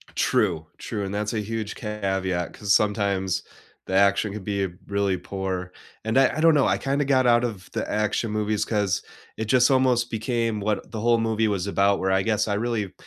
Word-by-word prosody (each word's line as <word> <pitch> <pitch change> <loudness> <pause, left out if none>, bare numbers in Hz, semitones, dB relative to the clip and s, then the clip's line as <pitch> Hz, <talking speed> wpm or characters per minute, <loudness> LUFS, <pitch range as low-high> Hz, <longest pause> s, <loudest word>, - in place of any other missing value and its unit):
True, 85 -6 +1
true, 105 - -4
and 95 - -5
that's 105 +2 -2
a 110 - 0
huge 110 0 -4
caveat 95 -4 -2
'cause 100 -2 0
sometimes 100 -3 +1 0.4
the - - -5
action 100 +1 +3
could 105 -2 -6
be 100 -1 -1 0.2
really 100 -2 0
poor. 95 -1 -4 0.3
And 110 +3 0
I 135 +2 +4
I - - 0
don't 165 0 +6
know, 140 - +4
I - - +2
kinda 140 +1 -1
got 130 -2 +3
out 120 0 +4
of 105 -6 -4
the - - -3
action 105 +1 0
movies 105 0 0
'cause 100 -4 0 0.4
it 110 - -2
just 125 +3 +4
almost 125 -2 +3
became 115 -1 -1
what 105 0 -2
the 110 - -4
whole 115 +1 +3
movie 110 0 +1
was 100 -2 -1
about 100 0 +2
where 95 0 0
I 95 - +3
guess 110 0 +1
I 100 - 0
really 110 -3 -2
105 Hz, 200 wpm, -24 LUFS, 100-115 Hz, 0.4 s, don't